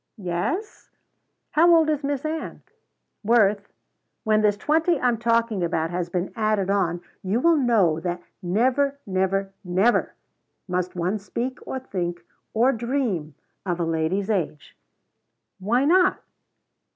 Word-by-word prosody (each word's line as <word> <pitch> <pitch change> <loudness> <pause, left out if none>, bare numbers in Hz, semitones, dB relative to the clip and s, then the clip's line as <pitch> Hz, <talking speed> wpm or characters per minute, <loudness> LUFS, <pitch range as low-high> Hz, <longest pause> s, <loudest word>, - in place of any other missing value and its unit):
"Yes?" 210 - -3 0.6
"How 335 +3 +5
old 325 -1 +4
is 300 -2 0
Miss 280 0 -2
Ann?" 315 +1 -4 0.6
"Worth, 205 -2 +2 0.5
when 215 0 +3
this 205 -1 +2
twenty 320 - +2
I'm 245 -3 +1
talking 230 -4 +1
about 165 -1 -1
has 175 0 -2
been 180 +1 -3
added 215 -4 +1
on, 175 -4 0 0.2
you 195 +5 0
will 335 +5 +4
know 220 - +3
that 175 +1 -4 0.2
never, 255 +9 +1
never, 195 0 -1
never 190 +6 +1 0.5
must 180 0 -2
one 180 +4 -1
speak 240 +6 -4
or - - -3
think 175 -9 -4 0.4
or 240 +4 +4
dream 235 - -2 0.3
of 180 -3 -2
a 170 - 0
lady's 165 +6 -1
age." 165 -7 -3 0.8
"Why 235 +8 +1
not?" 365 +4 +4
210 Hz, 130 wpm, -24 LUFS, 180-255 Hz, 0.8 s, How